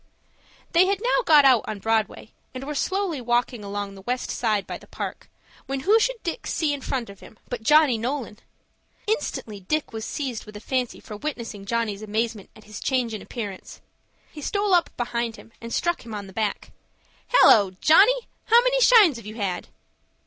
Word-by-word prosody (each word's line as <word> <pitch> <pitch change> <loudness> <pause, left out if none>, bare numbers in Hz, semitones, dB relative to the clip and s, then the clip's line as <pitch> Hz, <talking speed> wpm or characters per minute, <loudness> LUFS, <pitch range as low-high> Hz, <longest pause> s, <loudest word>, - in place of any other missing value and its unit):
They 355 +3 +5
had 395 0 0
now - - +2
got 300 -3 +7
out 255 -5 +5
on 215 - -4
Broadway, 220 +1 -1 0.2
and 255 - -5
were 295 +2 -4
slowly 375 -1 -1
walking 240 -1 0
along 200 0 -4
the 195 - -12
west 250 +5 -3
side 215 -4 0
by - - -6
the - - -17
Park, - - -7 0.4
when 270 0 -3
who 420 +9 +4
should - - +1
Dick 345 +7 -4
see 305 -3 0
in 285 - -5
front 255 -2 -3
of 200 - -15
him, 220 - -15
but 245 -2 -4
Johnny 295 -1 +4
Nolan? 245 -3 -4 0.7
Instantly 325 - -3
Dick 290 +9 -2
was 220 0 -5
seized 255 -3 -4
with 210 0 -9
a - - -8
fancy 250 +2 -2
for 210 - -9
witnessing 230 -7 -6
Johnny's 225 -2 -1
amazement 215 0 -3
at 215 - -16
his 215 -1 -9
change 250 -4 0
in 215 - -5
appearance. 205 -6 -7 0.5
He 300 - -10
stole 405 +5 0
up 350 -1 +4
behind 235 -1 -2
him, 225 - -15
and 230 0 -8
struck 345 +6 -1
him 225 -2 -7
on 205 -1 -6
the 190 - -13
back. 215 -1 -3 0.6
"Hallo, 210 - +6
Johnny, 460 +10 +5 0.2
how 465 +2 +6
many - - +2
shines 430 - +6
have 225 -3 -11
you 215 - -8
had?" 195 -5 -3
240 Hz, 190 wpm, -24 LUFS, 215-310 Hz, 0.7 s, got